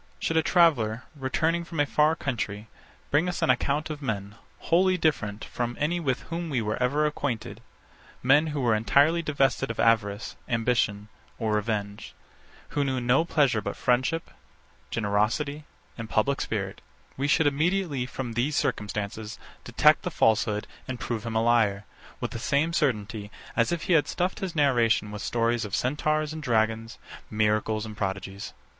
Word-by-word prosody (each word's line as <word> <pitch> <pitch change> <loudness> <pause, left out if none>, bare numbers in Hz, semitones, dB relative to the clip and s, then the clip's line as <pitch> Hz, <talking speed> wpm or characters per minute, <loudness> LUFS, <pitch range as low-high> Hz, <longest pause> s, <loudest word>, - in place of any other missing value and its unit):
Should 165 - -2
a - - +5
traveller, 140 -11 +3
returning 160 +5 0
from 165 -2 -6
a 145 - +4
far 150 +3 +3
country, 110 -8 -3 0.4
bring 155 +5 +3
us 175 - -3
an - - +5
account 145 +5 0
of 150 -1 -6
men, 100 -6 -3 0.2
wholly 185 +2 +2
different 110 - -1
from 120 0 -3
any 165 +4 0
with 135 -5 -1
whom 170 0 -5
we 135 -5 0
were 105 +1 -2
ever 145 +5 +2
acquainted; 140 -7 -3 0.6
men, 145 +5 +5
who 150 -2 -2
were 120 -3 +3
entirely 140 +10 +3
divested 135 -4 +1
of 115 - -5
avarice, 105 -2 +1
ambition, 115 -3 0 0.3
or 110 -2 -1
revenge; 105 -1 -3 0.5
who 145 - 0
knew 130 -2 -1
no 125 +6 +3
pleasure 140 -9 +2
but 100 0 -4
friendship, 130 +7 0 0.6
generosity, 115 +8 0 0.3
and 115 -1 -6
public 140 +6 +1
spirit; 100 -3 -3 0.3
we 140 +2 -1
should 155 +2 +3
immediately, 150 -2 +1
from 125 -2 -5
these 130 +6 0
circumstances, 105 0 -2 0.3
detect - - +4
the - - -3
falsehood, 105 -1 +2 0.2
and 130 -2 -4
prove 115 -2 -3
him 115 - -4
a 110 - +2
liar, 110 -4 +2 0.3
with - - -3
the - - -5
same 150 +6 +1
certainty 110 -9 -1 0.3
as 115 +5 +2
if 170 -2 -2
he 180 - +1
had 155 -3 +4
stuffed 180 +1 -1
his 185 -3 -4
narration 120 -7 +2
with 105 0 -6
stories 115 0 0
of 105 -2 -3
centaurs 155 +3 0
and 160 - -6
dragons, 110 -3 0 0.3
miracles 110 0 +1
and 110 -1 -8
prodigies. 95 -1 -4
125 Hz, 165 wpm, -27 LUFS, 110-150 Hz, 0.6 s, a